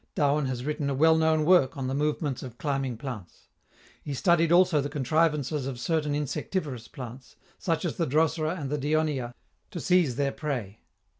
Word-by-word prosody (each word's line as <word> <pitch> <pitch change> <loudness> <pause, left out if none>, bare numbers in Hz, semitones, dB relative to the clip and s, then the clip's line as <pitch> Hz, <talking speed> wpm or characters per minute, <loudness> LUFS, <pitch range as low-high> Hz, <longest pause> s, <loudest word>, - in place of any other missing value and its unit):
Darwin 145 -1 +2
has 125 -1 -4
written 150 -1 -1
a 140 - -1
well 160 +4 +5
known 160 -1 +2
work 165 -6 +4
on 135 - -3
the 130 - -2
movements 145 -1 -1
of 125 -3 -9
climbing 135 -4 -2
plants. 110 - -8 0.5
He 145 - -5
studied 170 +2 +3
also 175 -4 +5
the 145 - -3
contrivances 150 -1 0
of 130 -3 -5
certain 150 +1 0
insectivorous 145 -3 -3
plants, 130 -2 -10 0.2
such 165 +1 -1
as 170 - -3
the 165 - 0
Drosera 160 +4 +1
and 140 -2 -4
the 150 - -1
Dionaea, 145 -4 0 0.3
to 175 - -6
seize 175 -8 +2
their 140 +1 0
prey. 125 -10 -4
145 Hz, 175 wpm, -27 LUFS, 130-160 Hz, 0.5 s, well